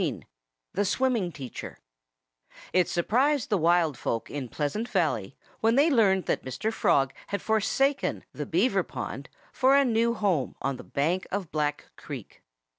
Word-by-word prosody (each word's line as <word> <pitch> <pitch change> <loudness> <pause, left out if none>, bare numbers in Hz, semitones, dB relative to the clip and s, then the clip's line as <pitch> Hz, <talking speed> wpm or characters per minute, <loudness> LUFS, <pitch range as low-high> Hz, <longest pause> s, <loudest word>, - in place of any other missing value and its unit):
XIX - - -1 0.6
THE 205 - +1
SWIMMING 235 -4 +1
TEACHER 135 -6 -8 1.0
It 180 -1 +3
surprised 255 - +1
the 205 - +4
wild 165 -4 +3
folk 115 - -2
in 135 -4 -4
Pleasant 185 - -2
Valley 115 - 0 0.2
when 225 +1 +3
they 295 +4 +5
learned 195 -7 +3
that - - -1
Mr. 130 - -3
Frog 135 -8 +2
had 200 - -2
forsaken 270 +6 +1
the - - -5
Beaver - - +2
pond - - -6 0.2
for 270 +1 +4
a 280 - +4
new 235 0 +2
home 185 - 0
on 135 -1 -2
the - - -9
bank 165 +7 -1
of 195 -4 -3
Black 150 -1 -2
Creek. - - -9
190 Hz, 155 wpm, -27 LUFS, 150-230 Hz, 1.0 s, they